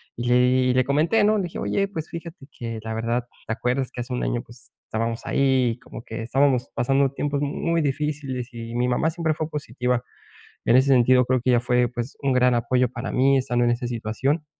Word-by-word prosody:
y 120 - -4
le 120 - +4
di 125 +1 +4
y - - +3
le 130 0 +3
comenté, 155 +9 +2
¿no? 215 +1 +3
Le 200 - 0
dije: 175 - -5
"Oye, 200 0 0
pues, 165 -5 -5
fíjate 165 -4 -9
que 115 -2 -5
la 110 0 -4
verdad, 115 +2 -1 0.2
¿te - - -3
acuerdas 125 +3 -1
que - - -9
hace 125 +1 -5
un 125 - -2
año, 120 - -1
pues, 120 +1 -17
estábamos 115 +1 -3
ahí, 130 -4 +2
como - - -9
que, 115 0 -6
estábamos 130 +1 +1
pasando 135 +3 +2
tiempos 140 0 -2
muy 165 +3 0
difíciles?" 140 -3 -2
Y 115 0 -7
mi 120 +1 +1
mamá, 125 +6 +1
siempre 165 -1 -1
fue 155 0 -4
positiva 125 -4 -2 0.6
en 120 - +5
ese 130 +2 +4
sentido, 125 -1 +5
creo 130 0 +2
que 130 - +2
ella 120 -1 +4
fue, 125 0 +2
pues, 120 +1 -6
un 135 -1 +2
gran 125 -1 +4
apoyo 125 +2 +2
para 120 +2 -5
mí, 135 +2 +4
estando 120 -2 +1
en 120 - +3
esa 120 +1 -2
situación. 125 +6 -2
125 Hz, 220 wpm, -24 LUFS, 120-140 Hz, 0.6 s, en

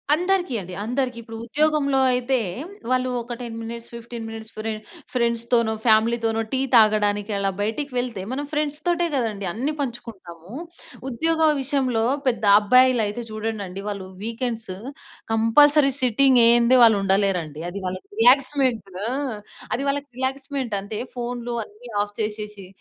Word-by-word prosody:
అందరికీ 360 -2 0
అండి. 185 -1 -8
అందరికి. 250 +2 -2
ఇప్పుడు 225 0 -9
ఉద్యోగంలో 285 +1 +2
అయితే 250 +1 +1 0.5
వాళ్ళు, 255 0 +1
ఒక 235 +1 -6
10 235 -2 -6
మినిట్స్, 230 +1 -7
15 235 0 -7
మినిట్స్ 225 0 -8
ఫ్రె 220 +1 -2 0.4
ఫ్రెండ్స్‌తోనో, 235 -1 +1
ఫ్యామిలీతోనో 225 0 +3
టీ 265 - 0 0.2
తాగడానికి, 210 -1 +3
అలా 200 0 0
బయటికి 230 +8 -2
వెళ్తే, 245 -5 -2
మనం 285 +2 -3
ఫ్రెండ్స్‌తోటే 305 +3 0
గదండీ 220 -6 -2
అన్నీ 255 - -2
పంచుకుంటాము. 200 - -7 0.6
ఉద్యోగ 320 +5 +2
విషయంలో 260 -4 0 0.2
పెద్ద 235 -3 +1
అబ్బాయిలైతే 240 0 +3
చూడండండి, 215 -3 -4
వాళ్ళు 200 -2 -5 0.2
వీకెండ్స్ 230 -2 -3 0.6
కంపల్సరీ 275 +6 +5
సిట్టింగేయందే 240 -1 +5
వాళ్ళుండలేరండి. 195 -7 +2
అది 200 +2 -6
వాళ్ళకి 185 0 -6
రిలాక్స్‌మెంట్. 255 -3 +3 0.2
ఆ! - - -1 0.6
అది 255 - -1
వాళ్ళకి 285 +1 -2
రిలాక్స్‌మెంటంతే. 260 -6 -3 0.2
ఫోన్‌లు 240 0 -4
అన్ని 220 +4 -15
ఆఫ్ 205 0 -10
చేషేషి, 210 -2 -5
235 Hz, 120 wpm, -23 LUFS, 215-260 Hz, 0.6 s, కంపల్సరీ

